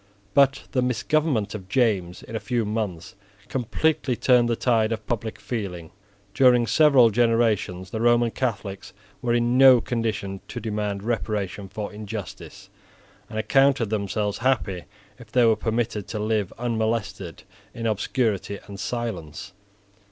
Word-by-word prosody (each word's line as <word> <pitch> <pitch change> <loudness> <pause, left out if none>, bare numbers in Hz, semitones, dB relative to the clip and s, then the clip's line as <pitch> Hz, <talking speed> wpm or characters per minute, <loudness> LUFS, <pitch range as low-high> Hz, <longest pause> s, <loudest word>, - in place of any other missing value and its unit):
But 135 -1 +4
the 130 - +1
misgovernment 125 -2 0
of 95 -3 -8
James 100 -8 0
in 115 - -8
a - - -1
few 120 -2 -1
months 105 -6 -4 0.4
completely 135 +2 0
turned 120 -1 +3
the 115 - +1
tide 115 -2 +1
of 110 -1 -4
public 115 -1 -3
feeling. 90 -8 -5 0.4
During 125 -1 +5
several 130 -1 +5
generations 110 -5 +1
the 110 - -3
Roman 120 0 +3
Catholics 100 -6 -4 0.3
were 120 -1 +1
in 120 +1 +2
no 130 -2 +8
condition 105 -5 -3
to - - -6
demand 105 -2 -3
reparation 105 -3 -3
for 105 0 -6
injustice, 105 -1 -8 0.6
and 110 - -6
accounted 135 -1 +3
themselves 105 0 -1
happy 105 -9 0 0.3
if 115 -3 -14
they 125 -1 +4
were 110 -1 +5
permitted 110 -2 -2
to 110 - -5
live 105 -2 -1
unmolested 110 -6 -2 0.3
in 115 - -5
obscurity 110 -2 -1
and 100 -1 -10
silence. 105 -6 -5
110 Hz, 135 wpm, -24 LUFS, 100-120 Hz, 0.6 s, no